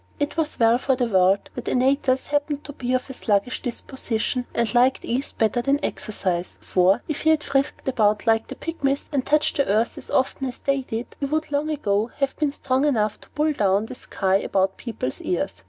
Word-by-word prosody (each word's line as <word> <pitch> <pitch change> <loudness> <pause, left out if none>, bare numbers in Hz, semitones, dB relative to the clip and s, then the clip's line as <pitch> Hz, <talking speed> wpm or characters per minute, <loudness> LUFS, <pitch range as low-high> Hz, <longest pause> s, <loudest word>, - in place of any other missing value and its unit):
It 290 0 -1
was 320 -2 -2
well 230 +1 +5
for 265 0 +1
the 250 -1 +1
world 190 -2 +2
that 245 - -5
Antaeus 260 0 +2
happened 290 0 -1
to 290 - -8
be 255 -1 -1
of 255 - -2
a 265 - -7
sluggish 210 0 0
disposition 245 -1 -3
and 235 -3 0
liked 250 +2 +3
ease 255 +4 -1
better 225 +2 +1
than 275 +3 +2
exercise; 185 -4 -3
for, 190 +5 +2
if 310 - -3
he 315 - +3
had 315 -1 +3
frisked 275 0 -1
about 215 -5 +2
like 225 -1 +2
the - - -7
Pygmies, 280 -4 -2
and 275 -3 0
touched 300 +2 +2
the 280 - +2
earth 215 +4 +1
as - - -11
often 265 0 0
as 250 - -6
they 275 -1 0
did, 235 -2 -6
he 280 - -1
would 310 +1 -2
long 290 +2 0
ago 215 -8 0
have 275 -1 0
been 300 -2 +1
strong 265 -1 0
enough 220 -8 +1
to - - -15
pull 305 +1 0
down 200 -3 +2
the 225 - -8
sky 195 -5 0
about 190 -1 0
people's 220 - -5
ears. 180 - -1
255 Hz, 210 wpm, -23 LUFS, 215-280 Hz, -, well